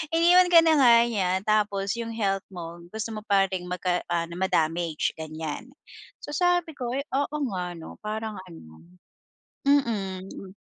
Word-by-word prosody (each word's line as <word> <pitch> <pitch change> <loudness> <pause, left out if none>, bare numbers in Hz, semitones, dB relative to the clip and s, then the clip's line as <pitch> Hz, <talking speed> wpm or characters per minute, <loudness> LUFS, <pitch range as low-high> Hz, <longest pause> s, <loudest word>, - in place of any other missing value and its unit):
Iniwan 355 +2 +6
ka 335 - +9
na 320 - +5
nga 240 -3 +7
niya 195 -6 0 0.2
tapos 205 -1 +1
yung 230 -1 -4
health 195 -3 -1
mo, 170 -1 -8
gusto 220 0 -4
mo 215 - -7
pa 195 -1 +3
ring 180 -1 -3
mag 180 -1 -3 0.3
ano 170 0 -1
ma-damage 165 -3 0
ganyan, 160 - -6 0.5
so - - -9
sabi 355 -3 +1
ko, 250 -3 -4
oo 280 +2 -2
nga 185 -3 -3
ano, 160 - -10
parang 215 0 -4
ano, 80 - -14 0.9
mm. 195 -7 -1
200 Hz, 145 wpm, -26 LUFS, 175-245 Hz, 0.9 s, ka